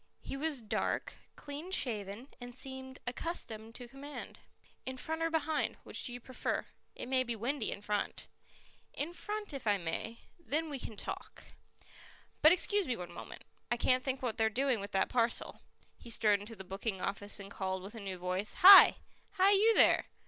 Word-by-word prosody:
He -, -, -5 dB
was 290 Hz, -2 st, -2 dB
dark, 215 Hz, -, -2 dB, 0.2 s
clean 290 Hz, +5 st, -7 dB
shaven 225 Hz, -, -2 dB
and 245 Hz, 0 st, -8 dB
seemed 260 Hz, 0 st, -6 dB
accustomed 230 Hz, -5 st, -4 dB
to 245 Hz, -, -8 dB
command. 280 Hz, +4 st, -9 dB, 0.4 s
"In 260 Hz, 0 st, -5 dB
front 320 Hz, +4 st, -3 dB
or 330 Hz, -, +2 dB
behind? 320 Hz, -1 st, 0 dB
Which -, -, -5 dB
do -, -, -3 dB
you 245 Hz, -, -6 dB
prefer? 255 Hz, +2 st, -3 dB, 0.3 s
It -, -, -6 dB
may 260 Hz, 0 st, +2 dB
be 240 Hz, -2 st, -2 dB
windy 240 Hz, +3 st, -2 dB
in 200 Hz, -, -6 dB
front." 210 Hz, 0 st, -2 dB, 0.7 s
"In 310 Hz, +4 st, -3 dB
front 415 Hz, 0 st, -5 dB
if 270 Hz, -5 st, -6 dB
I 205 Hz, -1 st, +4 dB
may; 180 Hz, +6 st, -4 dB, 0.2 s
then 320 Hz, -1 st, -2 dB
we 275 Hz, -, -4 dB
can 220 Hz, -3 st, -7 dB
talk." -, -, -7 dB, 1.0 s
"But 310 Hz, -, +8 dB
excuse 390 Hz, +2 st, +3 dB
me 250 Hz, -, -1 dB
one 180 Hz, -1 st, -7 dB
moment -, -, -9 dB, 0.3 s
I 240 Hz, -, +1 dB
can't 255 Hz, +2 st, +2 dB
think 265 Hz, -1 st, -2 dB
what 235 Hz, -2 st, -2 dB
they're 220 Hz, -1 st, +3 dB
doing 255 Hz, +1 st, +1 dB
with 200 Hz, +1 st, -6 dB
that 190 Hz, -, +2 dB
parcel." 235 Hz, -1 st, 0 dB, 0.4 s
He -, -, -11 dB
strode 210 Hz, -3 st, +3 dB
into 210 Hz, +3 st, -9 dB
the 190 Hz, -, -9 dB
booking 195 Hz, +2 st, -4 dB
office 205 Hz, +2 st, -3 dB
and 200 Hz, 0 st, -9 dB
called 190 Hz, -1 st, -3 dB
with 200 Hz, +3 st, -8 dB
a 225 Hz, -, -8 dB
new 195 Hz, -3 st, -5 dB
voice: 185 Hz, +3 st, -2 dB
"Hi! 390 Hz, +1 st, +11 dB, 0.4 s
hi, 380 Hz, +2 st, +5 dB
you 430 Hz, +3 st, +5 dB
there! -, -, +5 dB
245 Hz, 185 wpm, -33 LUFS, 210-290 Hz, 1.0 s, Hi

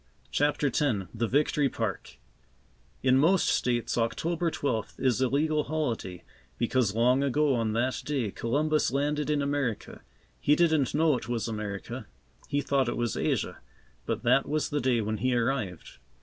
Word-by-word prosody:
CHAPTER 145 Hz, +1 st, +1 dB
X 140 Hz, +2 st, +1 dB, 0.3 s
THE 115 Hz, 0 st, -1 dB
VICTORY 145 Hz, +2 st, +2 dB
PARK 110 Hz, -6 st, -4 dB, 0.9 s
In 130 Hz, 0 st, +4 dB
most 175 Hz, +6 st, +3 dB
States 120 Hz, -1 st, 0 dB
October 165 Hz, +9 st, 0 dB
twelfth 115 Hz, -9 st, -3 dB
is 130 Hz, -1 st, +1 dB
a 130 Hz, -, +4 dB
legal 150 Hz, +3 st, +1 dB
holiday, 120 Hz, -, -3 dB, 0.3 s
because 120 Hz, -3 st, +1 dB
long 125 Hz, +4 st, +3 dB
ago 140 Hz, +1 st, +2 dB
on 115 Hz, -3 st, 0 dB
that 125 Hz, +3 st, 0 dB
day, 130 Hz, -8 st, -1 dB
Columbus 150 Hz, +8 st, +1 dB
landed 145 Hz, +3 st, -1 dB
in 150 Hz, -1 st, +1 dB
America. 140 Hz, -6 st, -2 dB, 0.4 s
He 150 Hz, -, +3 dB
didn't 160 Hz, -6 st, +2 dB
know 155 Hz, -1 st, +3 dB
it 120 Hz, -, -8 dB
was 120 Hz, -3 st, -1 dB
America; 105 Hz, -3 st, -5 dB, 0.4 s
he 145 Hz, -, 0 dB
thought 135 Hz, -3 st, +1 dB
it -, -, -3 dB
was 120 Hz, -3 st, -1 dB
Asia, -, -, -1 dB, 0.5 s
but -, -, -2 dB
that 135 Hz, -, +3 dB
was 155 Hz, 0 st, 0 dB
the 145 Hz, -, 0 dB
day 125 Hz, -2 st, +2 dB
when 110 Hz, +1 st, -2 dB
he 130 Hz, +3 st, +1 dB
arrived. 115 Hz, -, -2 dB
130 Hz, 160 wpm, -28 LUFS, 115-150 Hz, 0.9 s, In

